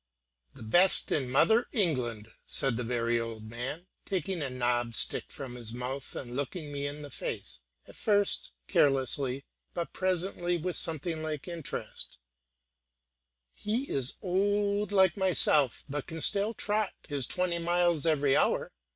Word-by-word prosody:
"The - - -10
best 175 - +3
in 130 -4 +1
mother 220 - +4
England," 125 - -1 0.2
said 135 -3 +1
the 125 - -2
very 120 0 0
old 115 -1 -5
man, 125 +9 -5 0.2
taking 185 -2 -2
a 140 - -1
knobbed 120 -2 0
stick - - +5
from 135 -3 -6
his 120 -2 -6
mouth, 130 +3 -5
and 120 -1 -6
looking 145 +3 -4
me 140 0 -2
in 145 +1 -6
the 145 - -9
face, - - -4 0.3
at - - -13
first 205 -2 +2 0.2
carelessly, 135 -1 +3 0.3
but 170 -1 -3
presently 180 -1 0
with 180 +2 -3
something 160 0 -1
like 155 -1 -4
interest; 170 - -6 1.4
"he 230 - -2
is 135 -1 0
old 205 +2 +1
like 190 -3 +4
myself, 155 -8 +4
but 145 0 -4
can 165 -1 -6
still 205 +6 +1
trot 210 0 0
his 140 -4 -2
twenty 180 -2 0
miles 175 -2 +2
an 155 -3 +2
hour. - - +2
150 Hz, 145 wpm, -30 LUFS, 130-185 Hz, 1.4 s, stick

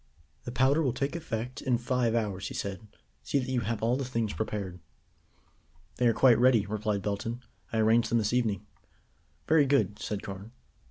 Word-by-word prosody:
"The 120 - -4
powder 130 +5 +3
will 130 -6 +1
take 140 +4 -2
effect 125 -6 -4
in 125 -3 +1
five 120 -1 0
hours," 100 -4 -1
he - - -7
said. 100 +2 -5 0.3
"See - - -1
that 130 -1 -1
you 130 - +1
have 115 -1 -3
all 120 +3 +2
the 140 - -2
things 115 -4 -2
prepared." 100 -4 -4 1.2
"They 125 - +3
are - - +5
quite 120 0 +5
ready," 120 -4 +5
replied 105 -1 -2
Belton. 115 +4 -3 0.3
"I 115 - -1
arranged 110 +1 +3
them 120 - +2
this 110 0 0
evening." 110 -6 0 0.8
"Very 155 -3 +5
good," 130 -7 +2
said 105 -1 -4
Carne. 100 +3 -8
115 Hz, 180 wpm, -29 LUFS, 105-125 Hz, 1.2 s, are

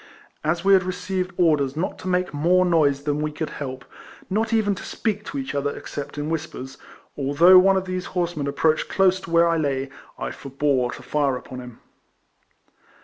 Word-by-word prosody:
As 170 +4 -1
we 195 - +6
had 190 - +6
received 185 0 -3
orders 150 -5 +2
not 175 - -2
to - - -7
make 180 -2 0
more 175 +5 +3
noise 145 -5 +2
than 150 0 -1
we 155 0 -1
could 155 +1 -4
help, 130 -2 -6 0.5
not 220 +3 0
even 215 -3 +2
to 190 - -8
speak 210 -2 -2
to 280 - -6
each 270 -1 -4
other, 145 0 -2
except 145 0 -7
in 145 +2 -3
whispers, 140 -5 -5 0.4
although 155 +7 +6
one 190 +1 +4
of 190 - -2
these 185 0 -3
horsemen 170 -5 -1
approached 155 +2 +1
close 190 -1 +3
to 175 - -10
where 170 0 +4
I 165 0 +2
lay, 135 -3 -1 0.3
I - - -4
forebore 135 -2 -1
to - - -10
fire 145 -3 0
upon 125 0 -9
him. 125 -2 -11
160 Hz, 190 wpm, -23 LUFS, 140-185 Hz, 0.5 s, we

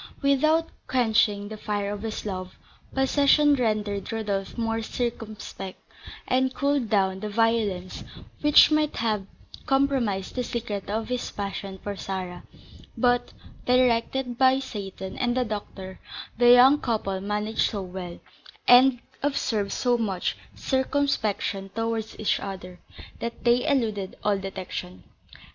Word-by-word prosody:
Without 310 +4 +3 0.2
quenching 220 -5 +2
the 215 - -7
fire 205 -1 -2
of 205 - -6
his 220 -1 -5
love, 185 -2 -5 0.3
possession 285 +2 +4
rendered 215 -6 -1
Rodolph 205 -3 -3
more 225 -1 -1
circumspect, 220 -5 -5 0.5
and 260 0 +1
cooled 280 -5 0
down 190 -3 +2
that 210 - -4
violence 210 -4 0 0.4
which 295 +1 +7
might 305 -1 +2
have 210 -4 -1 0.4
compromised 265 -9 +1
the 250 - -2
secret 220 -5 -4
of 220 +2 -2
his 250 -1 -2
passion 195 -1 -5
for 205 0 -4
Sarah; 185 -2 -5 0.6
but, 245 -1 +2 0.4
directed 250 0 +2
by 260 0 +5
Seyton 195 -7 -6
and 245 0 +1
the 250 - +2
doctor, 195 -3 -6 0.4
the 240 +1 +5
young 255 +4 +8
couple 195 -5 -1
managed 210 +2 0
so 200 -3 -4
well, 180 -1 -7 0.5
and 245 0 +7 0.2
observed 220 -8 0
so 245 -1 +1
much 195 -5 -1 0.2
circumspection 260 -8 -1
towards 225 -1 -3
each 215 - +1
other, 180 -2 -7 0.4
that 235 0 -5
they 245 +3 +3
eluded 215 -8 0
all 205 -1 +2
detection. 185 -1 -6
220 Hz, 125 wpm, -26 LUFS, 200-250 Hz, 0.6 s, young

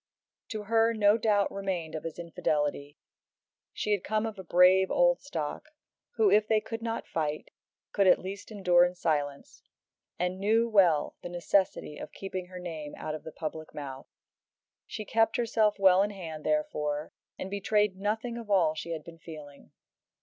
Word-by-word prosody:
To 215 -2 -5
her 225 +2 +3
no 205 -1 +5
doubt 210 -3 +2
remained 185 -5 -3
of 155 - -5
his 165 - -5
infidelity. 150 -3 -2 0.7
She 210 - -3
had 205 -3 +1
come 215 +1 0
of 220 -3 -5
a - - -6
brave 185 +2 +5
old - - +3
stock, 160 - -5 0.5
who, 430 -4 +4
if 210 0 +4
they 220 -1 +3
could 225 +1 -6
not 230 0 -3
fight, 155 -2 -3 0.4
could 200 -2 +3
at - - +7
least 195 +2 -7
endure 180 -5 +4
in 180 0 0
silence, 145 -5 -2 0.6
and 180 +1 -2
knew 225 +4 +3
well 180 -9 +3
the - - -6
necessity 175 -3 0
of - - -8
keeping 185 -2 -5
her 180 0 -10
name 160 -4 -6
out 155 - -4
of 155 - -6
the 160 - -8
public 155 0 -6
mouth. 135 -3 -7 0.8
She 215 - -6
kept 225 +1 +2
herself 220 -3 +2
well 190 -1 +6
in 205 - +1
hand, 165 -6 -7
therefore, 155 - -1 0.3
and 190 - -6
betrayed 205 0 +1
nothing 220 +4 -2
of 225 -3 -10
all 175 -6 +4
she 165 +2 -5
had 155 -2 -6
been 165 +1 -12
feeling. 150 -4 -11
190 Hz, 170 wpm, -29 LUFS, 160-215 Hz, 0.8 s, at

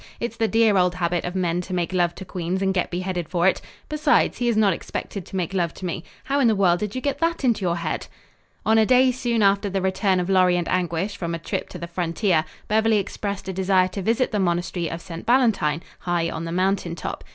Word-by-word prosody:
It's 235 -1 -3
the 225 -1 +2
dear 220 -2 +3
old 180 -1 +2
habit 175 -1 -1
of 175 +1 -4
men 175 -1 0
to 185 +1 -5
make 175 +1 -1
love 175 -2 +1
to 190 - -8
queens 185 +1 -3
and 190 0 +1
get 180 - 0
beheaded 180 -2 -3
for 175 -1 +1
it. 190 - +2 0.3
Besides, 305 0 +2
he 245 - 0
is 235 -2 +2
not 205 -4 +4
expected 190 +2 -6
to - - -9
make 185 0 -2
love 175 -3 0
to 185 - -7
me. 170 -2 -3 0.2
How 280 +1 0
in 260 - +4
the 220 - +3
world 180 -3 +3
did 210 +2 -4
you 255 - -2
get 280 0 -1
that 335 -2 0
into 235 -5 +2
your 175 -2 +1
head?" 170 -2 -3 0.6
On 220 +1 +4
a 220 - +5
day 255 0 +5
soon 235 -3 0
after 200 +1 +3
the 195 0 -1
return 190 0 +1
of 180 - -1
Lorry 185 -2 +4
and 175 - -2
Anguish 180 +2 -1
from 170 -1 -3
a - - -3
trip 165 - -4
to - - -8
the 170 - -5
frontier, 170 0 0 0.2
Beverly 220 +1 +3
expressed 200 0 -4
a 190 - -3
desire 185 0 +2
to 195 +2 -5
visit 230 +6 +1
the 210 - 0
monastery 175 -2 -1
of 165 - -5
St. 165 -1 -8
Valentine, 205 - +2 0.2
high 175 -2 -1
on 160 +1 -4
the 165 - -4
mountain 185 -1 0
top. 160 - -5
185 Hz, 245 wpm, -23 LUFS, 175-215 Hz, 0.6 s, a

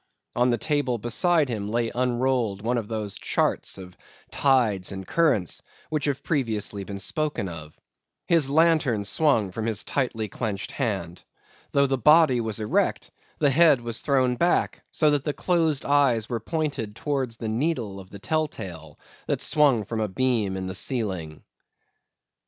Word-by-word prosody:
On 125 +1 +3
the 120 - +2
table 145 -2 0
beside 150 - +2
him 105 -4 -4
lay 115 +1 0
unrolled 125 -4 0
one 120 +1 +1
of 110 - -6
those 105 -3 -4
charts - - 0
of 90 -2 -11 0.4
tides 115 -10 +2
and 95 -1 -6
currents 140 - +1 0.3
which 155 -1 -1
have 140 -2 -2
previously 110 -8 -2
been 100 +1 -6
spoken 150 +2 -2
of. 80 -3 -9 0.5
His 165 -5 +3
lantern 150 -8 +3
swung 115 -6 +2
from 110 +4 -4
his 110 -3 0
tightly 120 -5 -2
clenched 105 -1 -4
hand. 95 - -3 0.5
Though 140 0 +3
the 135 -1 0
body 150 -2 +5
was 110 -1 -3
erect, 105 - 0 0.3
the 145 -2 +3
head 155 -2 +5
was 120 -1 -3
thrown 130 -3 +1
back 175 +5 +1
so 155 -2 +3
that 145 -2 +1
the 150 - -2
closed 165 -5 0
eyes 135 -6 +3
were 120 -2 -2
pointed 140 -5 -3
towards 130 -4 -2
the 115 - -5
needle 115 -4 -1
of 95 -1 -12
the 100 - -10
tell 155 +9 0
tale 80 - -9 0.3
that - - 0
swung 140 -8 +3
from 110 +2 -4
a 110 - 0
beam 110 -3 0
in 95 - -4
the 95 - -4
ceiling. 95 - -3
120 Hz, 165 wpm, -25 LUFS, 105-145 Hz, 0.5 s, body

